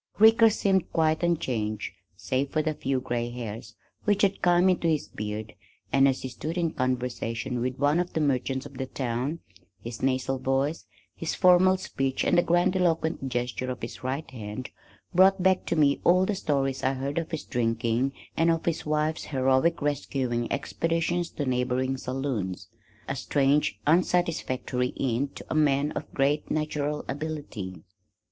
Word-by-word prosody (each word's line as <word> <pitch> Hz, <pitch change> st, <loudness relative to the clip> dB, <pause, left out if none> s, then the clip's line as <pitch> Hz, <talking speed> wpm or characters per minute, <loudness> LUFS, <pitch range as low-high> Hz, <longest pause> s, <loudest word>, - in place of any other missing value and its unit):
Ricker 225 Hz, +1 st, +7 dB
seemed 195 Hz, -3 st, +1 dB
quite 160 Hz, -1 st, +2 dB
unchanged 125 Hz, -, -1 dB, 0.3 s
save 135 Hz, +2 st, -1 dB
for 155 Hz, 0 st, 0 dB
the 155 Hz, 0 st, 0 dB
few 135 Hz, -3 st, -1 dB
gray 120 Hz, -2 st, -2 dB
hairs 115 Hz, -2 st, -7 dB, 0.3 s
which 205 Hz, -1 st, +2 dB
had 195 Hz, 0 st, +2 dB
come 175 Hz, +1 st, +4 dB
into 180 Hz, -2 st, +2 dB
his 155 Hz, -3 st, +1 dB
beard 105 Hz, +1 st, -5 dB, 0.4 s
and, 135 Hz, 0 st, +6 dB
as 135 Hz, -1 st, 0 dB
he -, -, -2 dB
stood 155 Hz, +8 st, -5 dB
in 170 Hz, -2 st, +1 dB
conversation 125 Hz, -1 st, -2 dB
with 130 Hz, +1 st, -2 dB
one 145 Hz, +4 st, +3 dB
of 180 Hz, 0 st, -2 dB
the -, -, 0 dB
merchants 135 Hz, -2 st, 0 dB
of 140 Hz, -2 st, -10 dB
the 130 Hz, -, -2 dB
town, 130 Hz, +5 st, -3 dB, 0.4 s
his 115 Hz, 0 st, -7 dB
nasal 130 Hz, 0 st, 0 dB
voice, 135 Hz, +4 st, 0 dB, 0.3 s
his 165 Hz, -, -3 dB
formal 185 Hz, +1 st, +5 dB
speech 135 Hz, -8 st, -2 dB
and -, -, +3 dB
the 175 Hz, -, +6 dB
grandiloquent 175 Hz, -4 st, +1 dB
gesture 125 Hz, +1 st, -2 dB
of 125 Hz, -, -5 dB
his 115 Hz, -, -7 dB
right 135 Hz, +4 st, -2 dB
hand 110 Hz, 0 st, -6 dB, 0.4 s
brought 190 Hz, +1 st, +5 dB
back 190 Hz, 0 st, +3 dB
to -, -, 0 dB
me 145 Hz, -3 st, +3 dB
all 180 Hz, +2 st, +5 dB
the 210 Hz, -, 0 dB
stories 135 Hz, -7 st, -1 dB
I 130 Hz, -, +2 dB
had -, -, -5 dB
heard 140 Hz, +3 st, -3 dB
of 165 Hz, -, -5 dB
his 160 Hz, -3 st, -4 dB
drinking 115 Hz, +2 st, 0 dB, 0.2 s
and 165 Hz, +1 st, +3 dB
of 165 Hz, -1 st, +1 dB
his 165 Hz, -2 st, -1 dB
wife's 155 Hz, +1 st, 0 dB
heroic 135 Hz, +4 st, +2 dB
rescuing 130 Hz, -4 st, -1 dB
expeditions 165 Hz, +4 st, -1 dB
to 145 Hz, -, -3 dB
neighboring 130 Hz, +1 st, 0 dB
saloons. 120 Hz, -9 st, -3 dB, 0.4 s
A -, -, -2 dB
strange, 140 Hz, +2 st, +1 dB
unsatisfactory 155 Hz, -7 st, +1 dB
end 135 Hz, +1 st, -1 dB
to -, -, -9 dB
a -, -, -3 dB
man 145 Hz, -1 st, +2 dB
of -, -, -6 dB
great 145 Hz, +2 st, +1 dB
natural 150 Hz, -1 st, -1 dB
ability. 135 Hz, -, -5 dB
140 Hz, 165 wpm, -27 LUFS, 125-165 Hz, 0.4 s, Ricker